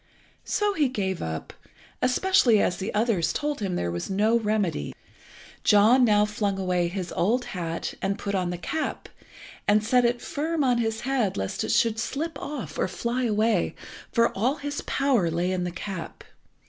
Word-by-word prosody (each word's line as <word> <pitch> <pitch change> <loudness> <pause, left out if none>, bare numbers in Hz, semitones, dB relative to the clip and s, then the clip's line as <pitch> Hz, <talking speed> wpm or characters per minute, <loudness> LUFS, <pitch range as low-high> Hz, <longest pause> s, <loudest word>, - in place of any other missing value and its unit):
So 415 -1 +1
he 305 -7 +2
gave 190 -7 -2
up, 80 -1 -5 0.5
especially 255 - +4
as 180 - +1
the 195 +3 -3
others 210 -7 +1
told 295 -1 -2
him 195 -4 -2
there 85 - -1
was 85 0 -4
no 210 +4 +2
remedy. 210 - -1 0.7
John 220 +5 +6
now 210 -3 +4
flung 210 -2 -1
away 180 -2 0
his 180 0 -4
old 240 +7 +1
hat, 170 -3 -3
and 195 +1 -1
put 200 - -4
on 185 -2 0
the 175 - -3
cap, 305 - -3 0.6
and 210 +1 +4
set 245 +3 +3
it 240 0 +2
firm 310 +3 -2
on 250 -2 +2
his 225 -1 -1
head 245 -6 0
lest 95 0 -2
it - - -3
should 225 -1 +2
slip 295 +5 -3
off 290 -5 -6
or - - +2
fly 240 +6 -2
away, 215 -3 +1 0.4
for 230 -1 +2
all 245 +8 +1
his 290 -1 -4
power 255 -11 +2
lay 170 +3 0
in 180 -1 -1
the 175 - -3
cap. 185 -1 -6
215 Hz, 175 wpm, -26 LUFS, 185-250 Hz, 0.7 s, John